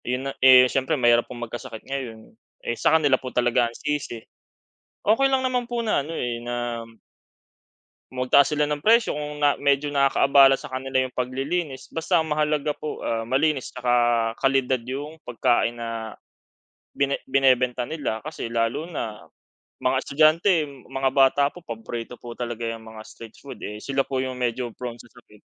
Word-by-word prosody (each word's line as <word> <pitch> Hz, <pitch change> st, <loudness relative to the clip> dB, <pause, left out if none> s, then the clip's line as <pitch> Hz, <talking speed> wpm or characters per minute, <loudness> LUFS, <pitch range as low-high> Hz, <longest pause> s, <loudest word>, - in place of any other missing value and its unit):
Yun 125 Hz, +2 st, -2 dB
na 135 Hz, -, -2 dB
eh, 130 Hz, -1 st, +8 dB
s'yempre 135 Hz, +4 st, 0 dB
mahirap 120 Hz, -2 st, +3 dB
pong 120 Hz, -1 st, -6 dB
magkasakit 110 Hz, -1 st, -8 dB
ngayon. 125 Hz, -5 st, -6 dB, 0.3 s
Eh, -, -, -1 dB
sa -, -, +2 dB
kanila 145 Hz, -4 st, +3 dB
po 130 Hz, -, -5 dB
talaga 120 Hz, -1 st, +2 dB
ang 115 Hz, -, -14 dB
sisi. 150 Hz, -5 st, -3 dB, 0.9 s
Okey 225 Hz, +6 st, +4 dB
lang 265 Hz, -1 st, +2 dB
naman 250 Hz, -1 st, -1 dB
po 240 Hz, -1 st, -1 dB
na 210 Hz, -, +2 dB
ano, 160 Hz, +4 st, -7 dB
eh, 120 Hz, -1 st, -2 dB
na 120 Hz, -1 st, -3 dB, 1.3 s
magtaas 130 Hz, +3 st, +3 dB
sila 150 Hz, 0 st, +1 dB
ng 150 Hz, -1 st, -3 dB
presyo 230 Hz, -3 st, +4 dB
kung 150 Hz, 0 st, -5 dB
na 145 Hz, -1 st, +3 dB
medyo 140 Hz, +1 st, +1 dB
nakakaabala 140 Hz, -1 st, +4 dB
sa -, -, -8 dB
kanila 130 Hz, 0 st, -2 dB
yung 130 Hz, -1 st, -2 dB
paglilinis. 135 Hz, +3 st, -3 dB
Basta 165 Hz, +2 st, 0 dB
mahalaga 150 Hz, -1 st, 0 dB
po, 155 Hz, -, -6 dB
ah, 115 Hz, -1 st, -2 dB
malinis 135 Hz, +3 st, 0 dB
'tsaka 120 Hz, -2 st, +1 dB
kalidad 135 Hz, -2 st, +1 dB
yung 140 Hz, +5 st, -6 dB
pagkain 120 Hz, 0 st, 0 dB
na, 115 Hz, -1 st, -5 dB, 0.8 s
bine 140 Hz, 0 st, 0 dB
binebenta 130 Hz, -2 st, +2 dB
nila. 140 Hz, -8 st, -3 dB
Kasi 145 Hz, -6 st, -6 dB
lalo 115 Hz, +6 st, 0 dB
na 115 Hz, -11 st, -6 dB, 0.5 s
mga 130 Hz, +1 st, +1 dB
estudyante, 155 Hz, +3 st, +3 dB, 0.2 s
mga 135 Hz, 0 st, -1 dB
bata 135 Hz, 0 st, +4 dB
po 180 Hz, -, -12 dB
paborito 115 Hz, -2 st, -7 dB
po 120 Hz, -1 st, -9 dB
talaga 120 Hz, -1 st, -4 dB
'yong 115 Hz, 0 st, -5 dB
mga 110 Hz, -1 st, -11 dB
street 115 Hz, -1 st, -13 dB
food. 140 Hz, -, -11 dB
Eh, 105 Hz, 0 st, -6 dB
sila 135 Hz, +5 st, -1 dB
po 135 Hz, -1 st, -4 dB
yung 130 Hz, 0 st, -2 dB
medyo 120 Hz, -1 st, -2 dB
prone 120 Hz, -1 st, -7 dB
sa -, -, -17 dB
sakit. -, -, -19 dB
130 Hz, 165 wpm, -24 LUFS, 120-145 Hz, 1.3 s, eh